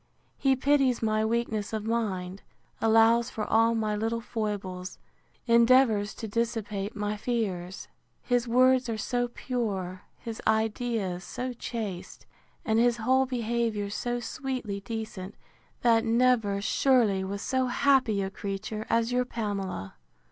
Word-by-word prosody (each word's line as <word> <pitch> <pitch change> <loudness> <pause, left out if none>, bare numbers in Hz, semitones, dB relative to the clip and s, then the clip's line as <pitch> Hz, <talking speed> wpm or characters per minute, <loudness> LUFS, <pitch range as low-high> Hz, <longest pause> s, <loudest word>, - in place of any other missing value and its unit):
He 270 -1 +3
pities 270 -3 +2
my 215 0 +1
weakness 220 -2 -1
of 215 -1 -3
mind, 195 -5 -2 0.4
allows 225 +1 +4
for 215 - -4
all 225 +1 +3
my 215 -2 0
little 225 +2 -1
foibles, 200 -5 -4 0.5
endeavours 235 -3 +4
to 225 - -6
dissipate 215 -2 -2
my 210 0 -2
fears; 200 -6 -3 0.4
his 245 -1 +1
words 255 +1 +4
are 225 - -2
so 245 +3 -1
pure, 205 -7 -3 0.2
his 225 -1 -7
ideas 220 -4 0
so 250 +6 -4
chaste, 220 -6 -6 0.4
and 220 0 +2
his 240 0 +3
whole 260 +3 +2
behaviour 230 -4 -1
so 240 +3 -2
sweetly 245 -5 -4
decent, 215 -3 -6 0.5
that 230 -1 +4
never, 225 -4 +2
surely, 220 -5 +3
was 200 +2 -4
so 260 -1 0
happy 255 -6 +2
a 190 - -4
creature 205 +2 -5
as 230 +1 +2
your 250 0 +2
Pamela! 200 - -4
225 Hz, 130 wpm, -28 LUFS, 205-245 Hz, 0.5 s, allows